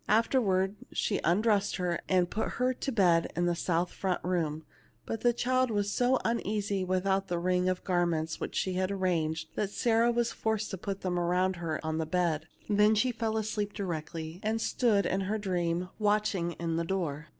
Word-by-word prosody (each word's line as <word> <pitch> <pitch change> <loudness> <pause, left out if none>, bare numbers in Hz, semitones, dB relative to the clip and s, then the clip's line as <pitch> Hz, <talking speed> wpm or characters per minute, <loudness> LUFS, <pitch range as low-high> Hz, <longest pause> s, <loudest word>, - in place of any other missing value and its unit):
Afterwards 210 -4 +2
she 205 - 0
undressed 205 +4 +2
her, 180 -2 -1
and 180 -2 +3
put 215 - -3
her 250 +1 +2
to 270 - -3
bed 175 -7 +3
in 175 - +1
the 175 - +2
south 175 0 0
front 185 -2 -1
room, 160 -4 -1 0.4
but 225 - -4
the 240 - +4
child 255 +2 +1
was 205 -2 0
so 250 +3 +3
uneasy 205 -4 0
without 190 +1 0
the 175 -2 -1
ring 180 +1 +1
of 185 0 -2
garments 170 -3 0
which - - -5
she 185 - 0
had 185 +1 0
arranged, 165 -5 -1
that 205 - -1
Sarah 230 +2 +2
was 235 0 0
forced 220 -1 -2
to 190 - -4
put 195 +1 -4
them 180 -1 -1
around 180 +1 +1
her 165 -2 -3
on 160 0 -1
the 160 - -2
bed; 160 -2 0 0.2
then 210 +1 +4
she 250 +4 +2
fell 225 -1 -2
asleep 210 -1 -2
di 200 - -4
rectly, 160 -1 -5
and 220 +1 0
stood 220 -4 +2
in 190 +2 0
her 200 +3 -1
dream 180 -3 -1
watching 205 -5 +1
in 165 0 -2
the 170 - 0
door. 165 -4 -2
190 Hz, 195 wpm, -30 LUFS, 175-215 Hz, 0.4 s, the